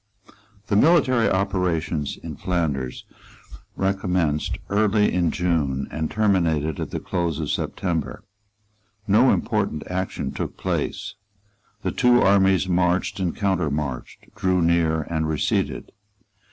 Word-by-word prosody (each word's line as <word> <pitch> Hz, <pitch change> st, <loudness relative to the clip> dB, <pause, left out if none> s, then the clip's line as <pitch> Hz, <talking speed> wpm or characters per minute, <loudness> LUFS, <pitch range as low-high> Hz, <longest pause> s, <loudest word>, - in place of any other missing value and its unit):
The 105 Hz, -, -1 dB
military 130 Hz, -3 st, +4 dB
operations 90 Hz, -6 st, -1 dB
in -, -, -6 dB
Flanders 75 Hz, -8 st, -2 dB, 0.7 s
recommenced 90 Hz, -6 st, 0 dB
early 105 Hz, 0 st, +2 dB
in 90 Hz, -2 st, +2 dB
June 75 Hz, -7 st, 0 dB
and 80 Hz, 0 st, -2 dB
terminated 85 Hz, -8 st, +1 dB
at -, -, -3 dB
the -, -, -4 dB
close 85 Hz, -4 st, -2 dB
of 75 Hz, -3 st, -2 dB
September. 85 Hz, -5 st, -3 dB, 0.8 s
No 110 Hz, +6 st, +5 dB
important 75 Hz, -, -1 dB
action 95 Hz, +1 st, -3 dB
took -, -, -5 dB
place. 105 Hz, -, -3 dB, 0.7 s
The -, -, 0 dB
two 125 Hz, -1 st, +4 dB
armies 95 Hz, -2 st, +4 dB
marched 90 Hz, +1 st, +1 dB
and 90 Hz, -3 st, -1 dB
countermarched, 75 Hz, -, -2 dB
drew 95 Hz, -3 st, +1 dB
near 80 Hz, -1 st, +2 dB
and 80 Hz, 0 st, -2 dB
receded. 75 Hz, -2 st, -1 dB
90 Hz, 115 wpm, -23 LUFS, 80-100 Hz, 0.8 s, No